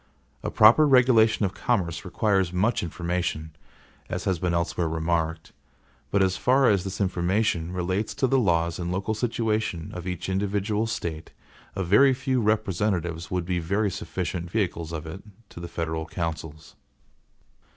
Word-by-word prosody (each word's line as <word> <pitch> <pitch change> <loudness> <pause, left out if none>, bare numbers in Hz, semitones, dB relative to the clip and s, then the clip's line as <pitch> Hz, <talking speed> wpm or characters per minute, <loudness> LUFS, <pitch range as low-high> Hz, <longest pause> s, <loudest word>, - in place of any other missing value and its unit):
A - - -3
proper 115 +8 +6
regulation 120 -5 +4
of 95 - -2
commerce 90 -9 -1
requires 95 -1 +1
much 100 +7 +1
information, 85 -2 -3 0.5
as - - -3
has 95 -3 0
been 90 0 0
elsewhere 85 0 0
remarked; 80 0 -2 0.6
but 100 -1 +2
as 95 0 +1
far 130 +1 +3
as 100 -3 +3
this 100 0 -5
information 90 -2 0
relates 95 +3 -2
to - - +1
the 135 +1 +3
laws 85 -6 +1
and 85 0 -3
local 95 +4 -1
situation 110 -6 -1
of 90 0 -6
each 90 -1 -4
individual 100 +3 -1
State, 85 -7 -5 0.4
a 95 - -1
very 130 +10 +5
few 130 -1 0
representatives 95 -5 -1
would 90 -2 -2
be 90 0 -1
very 100 +5 0
sufficient 90 -1 -4
vehicles 85 -5 -2
of 80 -1 -5
it 80 +5 -8 0.3
to - - -11
the 85 - -6
federal 80 -1 -3
councils. 80 -2 -5
90 Hz, 150 wpm, -25 LUFS, 85-110 Hz, 0.6 s, proper